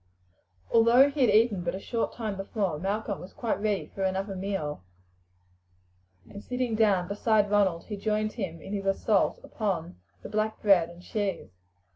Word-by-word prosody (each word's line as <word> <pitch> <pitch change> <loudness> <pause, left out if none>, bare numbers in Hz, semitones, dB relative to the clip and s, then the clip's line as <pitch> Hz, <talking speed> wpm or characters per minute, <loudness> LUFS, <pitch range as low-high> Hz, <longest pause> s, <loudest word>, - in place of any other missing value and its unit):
Although 235 +5 +6
he 285 0 -3
had 245 - +5
eaten 210 -2 +4
but 175 +1 -2
a - - -5
short 230 +3 -2
time 220 -4 -4
before, 195 -4 -2
Malcolm 200 +2 -2
was 185 - -11
quite 230 -4 -2
ready 210 -2 0
for 195 - -6
another 190 +1 -1
meal, 185 - -3 1.5
and 200 - -10
sitting 250 -2 -2
down 205 -5 +3
beside 205 +1 +1
Ronald 190 -5 +2
he 210 - -6
joined 215 +1 -1
him 180 -7 -5
in 195 - -7
his 195 -1 -3
assault 195 +1 +2
upon 175 - -3 0.2
the - - -7
black 215 +1 -1
bread 185 -5 +4
and 170 +1 -13
cheese. 195 - -3
200 Hz, 165 wpm, -28 LUFS, 190-220 Hz, 1.5 s, Although